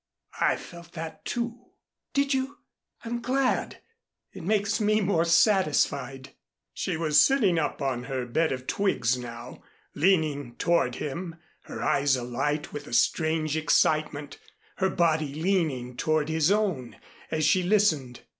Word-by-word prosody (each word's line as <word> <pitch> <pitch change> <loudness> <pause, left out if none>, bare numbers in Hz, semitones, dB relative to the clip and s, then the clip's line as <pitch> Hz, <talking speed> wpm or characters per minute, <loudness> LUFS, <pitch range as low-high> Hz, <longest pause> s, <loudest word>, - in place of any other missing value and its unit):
I - - +3
felt 170 -1 -12
that, 165 -1 -7
too." 235 0 -3 0.5
"Did 280 0 +2
you? 265 +1 -2 0.5
I'm 235 +1 -3
glad. 260 +2 0 0.5
It - - -9
makes 205 +4 0
me 215 +1 +3
more 180 -5 +1
satisfied." 150 - +2 0.4
She - - -2
was 155 -2 +4
sitting 210 -11 +3
up 150 - -2
on 125 -2 -2
her 130 -2 -3
bed 160 +7 0
of 130 -1 -4
twigs 130 - +1
now, 120 0 -8 0.3
leaning 150 -7 +1
toward 165 -7 +1
him, 165 +4 -5 0.3
her - - -6
eyes 140 -1 +2
alight 135 +5 -2
with 145 0 -7
a - - -9
strange 155 +2 +1
excitement, 155 -2 +1 0.4
her 190 -1 +1
body 155 -5 +1
leaning 155 -8 -1
toward 155 +3 0
his 160 0 +2
own, 190 - 0 0.3
as 155 -1 0
she 185 - +4
listened. 175 - +1
160 Hz, 135 wpm, -27 LUFS, 140-190 Hz, 0.5 s, was